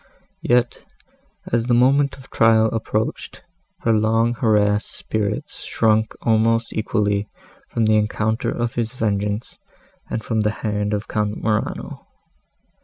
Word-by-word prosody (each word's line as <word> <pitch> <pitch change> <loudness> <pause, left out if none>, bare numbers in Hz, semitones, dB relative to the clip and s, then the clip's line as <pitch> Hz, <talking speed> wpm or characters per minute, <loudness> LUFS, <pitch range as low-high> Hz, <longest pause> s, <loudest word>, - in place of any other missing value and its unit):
Yet, 120 0 +1 0.7
as 115 0 +1
the 120 - +3
moment 140 +3 +3
of 135 0 -16
trial 110 -1 +4
approached, 110 -1 -3 0.4
her 115 - +2
long 115 +2 +2
harassed 105 -3 +2
spirits 105 -1 -3
shrunk 110 -1 +1
almost 115 +1 +2
equally 105 -1 0 0.4
from 115 - 0
the 110 0 +4
encounter 110 +2 0
of 120 0 -2
his 115 +1 -2
vengeance, 105 -1 -2 0.5
and 110 - -3
from 110 -2 0
the 105 0 +2 0.2
hand 105 0 0
of 105 - -5
Count 105 -1 -1
Morano. 110 -1 -3
110 Hz, 125 wpm, -21 LUFS, 105-115 Hz, 0.7 s, trial